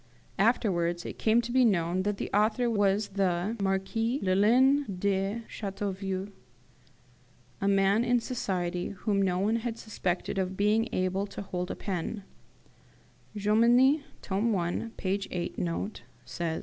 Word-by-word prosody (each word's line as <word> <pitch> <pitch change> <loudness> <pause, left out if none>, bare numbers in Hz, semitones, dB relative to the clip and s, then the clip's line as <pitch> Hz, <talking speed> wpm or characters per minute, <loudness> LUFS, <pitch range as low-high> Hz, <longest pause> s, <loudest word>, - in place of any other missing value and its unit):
Afterwards 175 -6 +1
it - - -7
came 225 +2 +3
to 240 0 -6
be 260 +1 +4
known 185 -4 +2
that 205 +1 -1
the - - -4
author 225 +3 +2
was 205 -1 +2
the 190 +1 0
Marquis 200 +6 0
Lullin 240 +9 +4
de 200 +3 -1
Chateauvieux, 195 -1 -4 1.3
a 195 - +1
man 200 +2 +3
in 245 0 +3
society, 180 -8 -2
whom 200 +1 -1
no 185 -2 +1
one 210 +5 +1
had 230 0 -4
suspected 190 -4 -3
of 190 0 -2
being 215 +3 +2
able 185 +2 -1
to 200 - -7
hold 180 -1 -4
a - - -3
pen: 195 +2 -4 1.1
Jomini 235 +8 +4 0.2
(tome 205 +3 0
i. 175 +5 -2
p. 195 +1 -1
8 175 -1 -4
note) 180 +4 -3 0.2
says. 165 -2 -3
200 Hz, 135 wpm, -29 LUFS, 185-225 Hz, 1.3 s, be